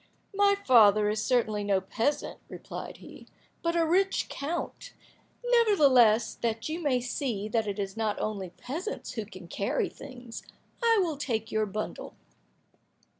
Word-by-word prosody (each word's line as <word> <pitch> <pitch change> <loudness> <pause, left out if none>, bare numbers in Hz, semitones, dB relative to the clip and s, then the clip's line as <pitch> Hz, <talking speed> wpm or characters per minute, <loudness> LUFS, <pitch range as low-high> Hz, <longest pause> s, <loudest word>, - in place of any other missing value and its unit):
"My 400 0 +4
father 210 -4 +6
is 215 0 -1
certainly 220 -5 +1
no 200 -1 +2
peasant," 225 +9 -2
replied - - -8
he, - - -13 0.3
"but 335 0 0
a 335 -1 +3
rich 380 +4 +1
count; 315 +5 -5 0.5
nevertheless, 280 - +5
that 225 -1 -1
you 315 +2 -3
may 275 -5 +2
see 240 -4 -3
that 225 -1 0
it 200 0 -3
is 195 -1 -3
not 220 -2 -1
only 200 -4 -3
peasants 310 - -6
who 220 -5 -5
can 185 -4 -11
carry 200 +4 -1
things, 245 -3 -10 0.4
I 460 -1 +4
will 320 -5 -2
take 225 -6 -2
your 215 0 +1
bundle." 215 +2 -5
235 Hz, 145 wpm, -28 LUFS, 210-310 Hz, 0.5 s, father